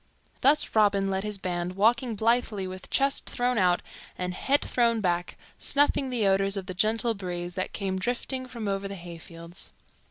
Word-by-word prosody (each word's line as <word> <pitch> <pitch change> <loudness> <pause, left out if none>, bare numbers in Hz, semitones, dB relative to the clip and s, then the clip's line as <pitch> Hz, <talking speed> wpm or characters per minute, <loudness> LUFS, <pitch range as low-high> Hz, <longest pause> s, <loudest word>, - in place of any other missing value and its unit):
Thus 290 +3 +4
Robin 200 -2 +3
led 190 0 -1
his 210 -1 -3
band, 180 -1 -3
walking 230 +3 +2
blithely 220 -2 +1
with 185 0 -8
chest 275 0 +1
thrown 245 -1 +1
out 180 -2 +3 0.3
and 180 0 -2
head 275 +9 +2
thrown 235 -2 +2
back, 175 -3 -1 0.2
snuffing 280 -1 +2
the 240 -4 0
odors 195 +1 +2
of 190 - -4
the 185 - -5
gentle 220 +5 +2
breeze 175 -3 -5
that 185 0 -2
came 190 -2 -2
drifting 255 +4 -2
from 235 -4 -5
over 195 0 -1
the 200 - -6
hayfields. 170 0 -8
200 Hz, 170 wpm, -27 LUFS, 185-235 Hz, 0.3 s, Thus